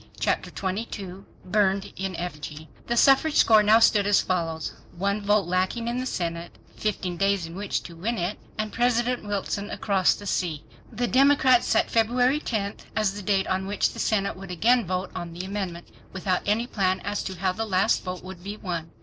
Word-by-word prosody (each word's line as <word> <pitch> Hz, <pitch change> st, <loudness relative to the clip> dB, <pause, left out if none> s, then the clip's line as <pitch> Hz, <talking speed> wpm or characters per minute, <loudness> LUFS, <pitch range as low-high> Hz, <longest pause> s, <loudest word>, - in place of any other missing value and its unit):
Chapter -, -, 0 dB
22 195 Hz, -1 st, -5 dB, 0.2 s
Burned 195 Hz, 0 st, +1 dB
in 190 Hz, -1 st, -4 dB
Effigy 155 Hz, -2 st, -6 dB, 0.2 s
The 235 Hz, -, 0 dB
suffrage 275 Hz, +5 st, +5 dB
score 220 Hz, -2 st, +6 dB
now 210 Hz, +1 st, +6 dB
stood 210 Hz, -3 st, +4 dB
as 205 Hz, -, +5 dB
follows: 165 Hz, -3 st, -2 dB, 0.2 s
One 200 Hz, +3 st, 0 dB
vote 205 Hz, 0 st, +2 dB
lacking 185 Hz, +6 st, -1 dB
in 240 Hz, +1 st, -1 dB
the 255 Hz, -, -2 dB
Senate, 170 Hz, -5 st, -4 dB, 0.2 s
15 190 Hz, -4 st, -2 dB
days 195 Hz, -2 st, +1 dB
in 165 Hz, -, -9 dB
which 200 Hz, +2 st, -3 dB
to 170 Hz, -, -10 dB
win 220 Hz, +8 st, -2 dB
it, 180 Hz, +4 st, -2 dB, 0.2 s
and 215 Hz, -1 st, -3 dB
President 245 Hz, +1 st, +1 dB
Wilson 205 Hz, 0 st, -3 dB
across 195 Hz, -3 st, +2 dB
the 205 Hz, -, -10 dB
sea! 170 Hz, -6 st, -1 dB, 0.3 s
The 240 Hz, +1 st, -1 dB
Democrats 265 Hz, -2 st, +4 dB
set -, -, +2 dB
February 245 Hz, +5 st, +3 dB
10 205 Hz, -8 st, -2 dB, 0.2 s
as 215 Hz, -2 st, +1 dB
the 205 Hz, -, -6 dB
date 195 Hz, -1 st, +1 dB
on 190 Hz, +1 st, -1 dB
which 205 Hz, -, +1 dB
the -, -, -9 dB
Senate 200 Hz, -3 st, 0 dB
would 195 Hz, +1 st, -10 dB
again 230 Hz, +5 st, +2 dB
vote 185 Hz, +1 st, -2 dB
on 170 Hz, -1 st, -6 dB
the 175 Hz, +2 st, -5 dB
amendment, 190 Hz, -3 st, -4 dB, 0.2 s
without 185 Hz, -1 st, -1 dB
any 215 Hz, +3 st, +2 dB
plan 190 Hz, -5 st, 0 dB
as 205 Hz, 0 st, -2 dB
to 190 Hz, -, -5 dB
how 185 Hz, +1 st, 0 dB
the 225 Hz, +4 st, -3 dB
last 190 Hz, -3 st, +2 dB
vote 180 Hz, -1 st, -5 dB
would 185 Hz, -1 st, -10 dB
be 205 Hz, +2 st, -6 dB
won. 170 Hz, -5 st, -4 dB
200 Hz, 190 wpm, -25 LUFS, 185-220 Hz, 0.3 s, score